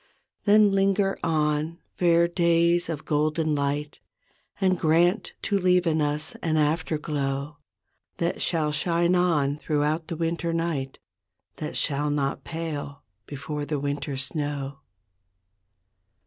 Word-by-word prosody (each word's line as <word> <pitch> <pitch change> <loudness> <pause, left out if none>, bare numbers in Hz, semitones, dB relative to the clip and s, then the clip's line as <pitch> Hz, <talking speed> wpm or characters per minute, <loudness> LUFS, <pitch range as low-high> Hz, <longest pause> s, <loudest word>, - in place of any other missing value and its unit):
Then 210 0 +6
linger 195 0 +2
on, 155 0 0 0.2
fair 170 -1 +4
days 170 0 +2
of 155 -2 -4
golden 155 +1 +1
light. 145 +1 -2 0.6
And 185 -3 +2
grant 170 +6 +2
to 200 -2 +1
leave 180 -1 +3
in 160 -2 +2
us 150 +1 -1
an 155 -2 0
after 155 +1 +1
glow, 145 -1 -3 0.6
That 170 +1 -1
shall 155 -3 0
shine 170 +4 +1
on 155 -6 +2
throughout 150 +2 0
the 165 - -4
winter 165 0 -1
night. 165 -5 -2 0.6
That - - -4
shall 145 +1 +1
not 140 -2 -1
pale 155 -4 -5 0.2
before 145 +1 -5
the 145 0 -2
winter 140 0 -3
snow. 140 0 -3
155 Hz, 120 wpm, -26 LUFS, 145-170 Hz, 0.6 s, Then